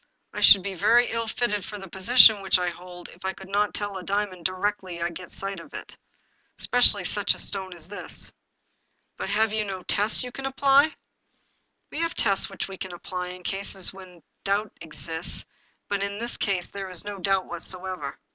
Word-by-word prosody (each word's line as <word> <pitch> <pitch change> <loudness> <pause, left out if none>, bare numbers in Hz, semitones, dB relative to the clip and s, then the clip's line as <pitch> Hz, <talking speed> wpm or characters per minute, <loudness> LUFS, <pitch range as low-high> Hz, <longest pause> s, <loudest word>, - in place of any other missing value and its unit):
" - - -49
I - - -4
should 190 - +8
be 200 0 -3
very 235 +7 +4
ill 230 0 -2
fitted 215 -3 -1
for 210 - -7
the 195 -1 -9
position 210 +3 +6
which 190 -1 +3
I 180 -1 -1
hold 180 0 -11
if - - -16
I 190 0 -1
could 190 0 -12
not 205 +1 +1
tell 205 -2 -3
a 185 - -7
diamond 195 -2 -2
directly 185 -1 -2
I 170 +1 -1
get 180 +2 -9
a - - -21
sight 195 0 -4
of - - -12
it, - - -8 0.6
especially 240 -6 +6
such 205 +3 +1
a - - -10
stone 190 -2 -2
as 165 -1 -9
this." 205 +2 -6 0.4
" - - -47
But - - -3
have 215 +1 +2
you 215 -1 +1
no 190 -3 -6
tests 210 +6 +2
you 250 - -6
can 270 +2 -4
apply? 275 +3 +4 0.3
" - - -44
" - - -49
We - - -4
have 335 0 -1
tests 195 -3 +1
which 195 - -5
we 195 -1 -9
apply 180 +1 -5
in 180 0 -9
cases 195 0 -2
in 185 -2 -12
which 170 - -21 0.2
doubt 200 +1 -1
exists, 165 +1 +1 0.4
but 200 -1 -1
in 200 0 -2
this 235 +2 -3
case 190 -3 -1
there 195 -1 -6
is 185 +1 -4
no 205 -1 -6
doubt 195 0 +1
whatever. 180 -2 -6
195 Hz, 215 wpm, -26 LUFS, 185-210 Hz, 0.6 s, should